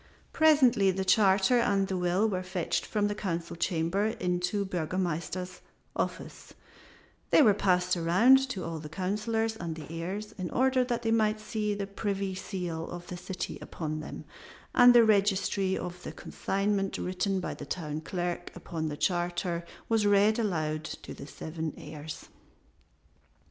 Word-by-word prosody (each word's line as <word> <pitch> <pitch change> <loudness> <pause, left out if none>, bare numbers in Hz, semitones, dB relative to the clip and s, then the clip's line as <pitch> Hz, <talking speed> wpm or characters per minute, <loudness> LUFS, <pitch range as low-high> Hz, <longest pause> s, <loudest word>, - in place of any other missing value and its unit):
Presently 275 -11 +5
the 190 0 -1
charter 195 +4 +4
and 195 -4 +2
the 190 - -2
will 180 +4 +2
were 185 -4 -1
fetched 185 -2 -2
from 210 -2 +1
the 205 - -1
Council 170 -6 -3
chamber 170 +4 0
into 180 -2 -1
the - - -6
Burgomaster's 180 0 -3 0.3
office, - - -4 0.7
they 310 - +6
were 215 -5 +6
passed 180 -2 +2
around 230 +11 +5
to 190 -8 -4
all 165 -1 -4
the 150 0 -8
Councilors 215 +5 -1
and 170 -6 -5
the 155 -2 -8
heirs, 185 +6 -4
in 180 -2 -3
order 260 0 +3
that 245 -1 -2
they 225 - +1
might 215 -1 +2
see 215 -1 -2
the 200 -1 -3
privy 200 -1 -2
seal 180 -4 -4
of 175 0 -7
the 180 - -7
city 185 +1 -5
upon 155 -2 -4
them, 155 - -8 0.5
and 245 0 +8
the 235 -1 +8
registry 195 -2 +2
of 180 0 -6
the - - -6
consignment 195 0 -1
written 185 +1 -1
by 180 - -3
the - - -9
town 155 -3 -4
clerk 175 +1 -3
upon 160 -2 -4
the 145 - -5
charter 175 0 -1 0.2
was 220 -2 +2
read 205 +2 +4
aloud 155 -7 -1
to - - -7
the - - -9
seven 160 0 -5
heirs. 155 0 -8
190 Hz, 160 wpm, -29 LUFS, 175-210 Hz, 0.7 s, and